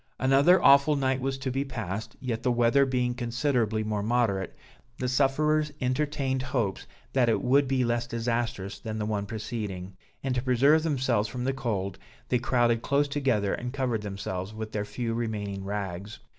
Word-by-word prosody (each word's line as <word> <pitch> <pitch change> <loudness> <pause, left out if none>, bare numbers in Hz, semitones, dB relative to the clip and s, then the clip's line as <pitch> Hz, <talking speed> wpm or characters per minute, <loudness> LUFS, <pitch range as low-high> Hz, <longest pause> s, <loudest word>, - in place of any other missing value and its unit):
Another 140 +8 +5
awful 140 +2 +6
night 135 -1 0
was 135 0 -1
to 135 -1 -3
be 135 +2 0
passed, 110 -4 -5
yet 115 -3 -3
the 125 - +1
weather 120 +3 +4
being 125 -1 0
considerably 120 -2 0
more 105 -1 -1
moderate, 105 -4 0 0.4
the 125 - -2
sufferers 150 +4 +2
entertained 135 0 0
hopes 125 -7 -2 0.3
that 125 -3 +3
it 115 - +2
would 135 +2 +4
be 130 -1 +1
less 120 0 0
disastrous 115 -4 -2
than 110 -2 -5
the 105 - -2
one 105 -1 -2
preceding; 105 -4 -5 0.3
and 135 -1 0
to 125 - 0
preserve 135 +5 +4
themselves 130 -8 +1
from 125 +1 -4
the 135 +1 0
cold, 100 -8 -3 0.3
they 125 - +2
crowded 120 -1 +2
close 145 +3 +2
together 130 -9 0
and 125 +1 -4
covered 125 -5 -1
themselves 100 0 -5
with 110 0 -5
their 105 -1 -2
few 115 +1 -3
remaining 105 -4 -3
rags. 100 0 -4
120 Hz, 170 wpm, -28 LUFS, 110-135 Hz, 0.4 s, awful